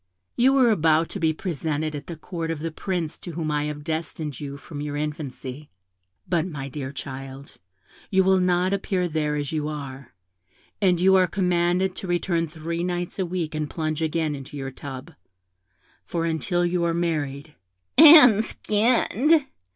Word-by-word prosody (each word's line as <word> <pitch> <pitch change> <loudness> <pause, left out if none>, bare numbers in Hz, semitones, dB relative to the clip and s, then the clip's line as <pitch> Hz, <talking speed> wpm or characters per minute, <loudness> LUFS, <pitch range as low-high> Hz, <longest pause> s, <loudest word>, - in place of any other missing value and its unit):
You 265 +3 +4
are 250 -3 +5
about 160 -4 +3
to 200 - -6
be 160 -2 +2
presented 155 -2 -3
at 145 0 -7
the 170 - -6
Court 165 +1 -5
of 165 - -2
the 165 +2 -4
Prince 170 -1 -3
to 175 - -8
whom 155 -1 -2
I 150 0 0
have 150 -1 -5
destined 155 -2 -4
you 140 -1 -6
from 145 0 -8
your 145 0 -4
infancy; 150 -2 -5 0.6
but, 175 -1 0
my 140 -5 -6
dear 135 -1 -5
child, 135 0 -8 0.5
you 190 -1 +3
will 190 0 +4
not 180 +1 +2
appear 185 -2 -1
there 150 -2 -1
as 145 -2 -3
you 155 -2 -2
are, 140 -4 -7 0.7
and 180 -3 +3
you 190 +2 +5
are 185 -1 +4
commanded 180 0 +1
to 190 - -5
return 175 -1 0
three 165 +2 -4
nights 175 +1 -3
a 185 - 0
week 170 -3 -3
and 155 -1 -3
plunge 155 -1 -3
again 160 -1 0
in 135 -2 -7
your 135 -2 -6
tub; 135 +4 -9 0.9
for 170 -2 -2
until 175 +2 0
you 175 0 0
are 170 -1 +1
married' 150 -3 -2 0.4
'and 285 -8 +9
skinned!' 245 +8 +2
165 Hz, 170 wpm, -24 LUFS, 150-180 Hz, 0.9 s, and